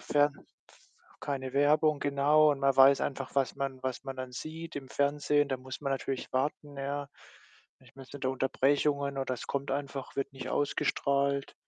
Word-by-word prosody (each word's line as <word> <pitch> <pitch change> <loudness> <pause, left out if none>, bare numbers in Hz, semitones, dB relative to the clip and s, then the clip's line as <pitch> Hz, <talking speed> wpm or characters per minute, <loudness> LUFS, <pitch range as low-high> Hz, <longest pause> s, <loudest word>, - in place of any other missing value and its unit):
Fern 145 0 +2 0.4
f - - -22 0.4
keine 130 -2 -3
Werbung, 150 +1 +3
genau, 145 +2 +4
und 140 - -5
man 135 0 +3
weiß 135 +1 +7
einfach, 135 -1 -3
was 135 -2 +1
man 135 -1 -3
was 130 -1 -3
man 135 -1 -5
dann 130 -1 -6
sieht. 160 +7 -7
Im 135 -2 -6
Fernsehen, 145 +1 +1
da 135 - -1
muss 130 +2 -8
man 140 -1 0
natürlich 135 -1 -3
warten, 145 +2 -2
ja. 140 +1 -3 0.7
Ich 130 -2 -20
meinte 135 +1 -10
da 130 - 0
Unterbrechungen 140 +2 +1
oder 135 -1 -1
es 120 - -8
kommt 140 0 -3
einfach 140 -1 -4
wird 140 0 -2
nicht 135 -1 -7
ausgestrahlt. 140 -1 0
140 Hz, 175 wpm, -30 LUFS, 135-145 Hz, 0.7 s, weiß